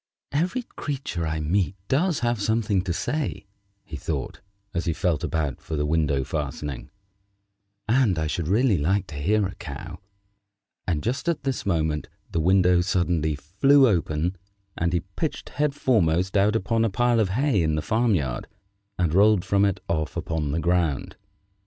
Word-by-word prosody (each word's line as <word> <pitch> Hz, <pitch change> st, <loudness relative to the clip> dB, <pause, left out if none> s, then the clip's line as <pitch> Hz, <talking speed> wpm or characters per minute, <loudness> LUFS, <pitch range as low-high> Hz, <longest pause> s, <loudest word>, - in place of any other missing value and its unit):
"Every 180 Hz, -, 0 dB
creature 135 Hz, -, -4 dB
I 80 Hz, 0 st, -2 dB
meet 90 Hz, +5 st, 0 dB
does 165 Hz, +3 st, +1 dB
have 120 Hz, -3 st, 0 dB
something 110 Hz, -2 st, +1 dB
to 90 Hz, -, -1 dB
say," 145 Hz, -, -2 dB, 0.4 s
he 80 Hz, -, -7 dB
thought, -, -, -4 dB, 0.3 s
as 85 Hz, -1 st, -2 dB
he 85 Hz, -, +1 dB
felt 85 Hz, -3 st, 0 dB
about 75 Hz, -5 st, -2 dB
for 80 Hz, -, -5 dB
the 75 Hz, 0 st, 0 dB
window 75 Hz, -3 st, +1 dB
fastening, 75 Hz, -1 st, -4 dB, 1.0 s
"and 115 Hz, -6 st, +3 dB
I 80 Hz, -, 0 dB
should 80 Hz, +1 st, -2 dB
really 105 Hz, -, +3 dB
like 95 Hz, +6 st, +1 dB
to 75 Hz, -, -8 dB
hear 100 Hz, +8 st, +2 dB
a 95 Hz, -, -4 dB
Cow" 85 Hz, +1 st, -8 dB, 0.9 s
and 80 Hz, -5 st, 0 dB
just 125 Hz, -, -1 dB
at 170 Hz, -, -1 dB
this 135 Hz, -6 st, -2 dB
moment 80 Hz, -4 st, 0 dB, 0.2 s
the 85 Hz, -, 0 dB
window 90 Hz, 0 st, +4 dB
suddenly 85 Hz, -4 st, +1 dB
flew 130 Hz, -, +4 dB
open, 85 Hz, -2 st, 0 dB, 0.4 s
and 85 Hz, 0 st, 0 dB
he 85 Hz, -1 st, +1 dB
pitched 95 Hz, -, -4 dB
head 145 Hz, -1 st, 0 dB
foremost 95 Hz, -, +2 dB
out 105 Hz, +2 st, +3 dB
upon 115 Hz, +2 st, +1 dB
a 115 Hz, -, +2 dB
pile 120 Hz, +3 st, +2 dB
of 105 Hz, -4 st, +2 dB
hay 125 Hz, 0 st, +2 dB
in 80 Hz, -1 st, +1 dB
the 75 Hz, -, -2 dB
farm 115 Hz, -1 st, +2 dB
yard, 65 Hz, -7 st, -2 dB, 0.5 s
and 85 Hz, -3 st, +1 dB
rolled 100 Hz, 0 st, +4 dB
from 100 Hz, 0 st, +3 dB
it 100 Hz, -2 st, -1 dB
off 80 Hz, -3 st, -2 dB
upon 80 Hz, -3 st, -2 dB
the 80 Hz, -, 0 dB
ground. 85 Hz, -5 st, 0 dB
90 Hz, 170 wpm, -25 LUFS, 80-115 Hz, 1.0 s, window